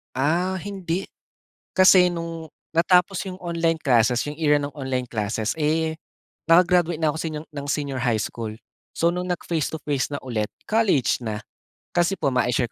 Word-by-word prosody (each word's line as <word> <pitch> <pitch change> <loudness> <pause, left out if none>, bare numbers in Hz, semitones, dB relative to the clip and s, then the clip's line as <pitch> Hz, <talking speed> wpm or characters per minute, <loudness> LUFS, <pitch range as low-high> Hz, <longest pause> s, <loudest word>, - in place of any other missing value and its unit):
Ah, 175 +8 +1
hindi. 190 -1 -4 0.7
Kasi 185 -1 +6
'nong 165 -2 -6 0.2
natapos 180 +3 +3
'yong 185 -1 -7
online 165 -2 0
classes, 120 -2 +3
'yong 145 - -5
era 150 -2 +3
ng 145 - -3
online 130 -3 -2
classes, 110 +3 -2
eh, 160 +1 0 0.5
naka-graduate 170 -1 +4
na 160 - +3
ako 150 - -1
seniang 155 -1 -4
ng 145 -2 -7
senior 140 -2 -1
high 115 -3 +2
school. 110 0 -4 0.4
So 170 - +2
'nong 180 +1 -1
nag-face 165 -3 -2
to 160 - -5
face 145 -1 -1
na 145 - -3
ulit, 110 -5 -3 0.2
college 195 - +2
na. 110 -1 -3 0.5
Kasi 175 +2 +2
po, 140 - 0
mai-share 125 -1 +1
160 Hz, 160 wpm, -24 LUFS, 130-175 Hz, 0.7 s, Kasi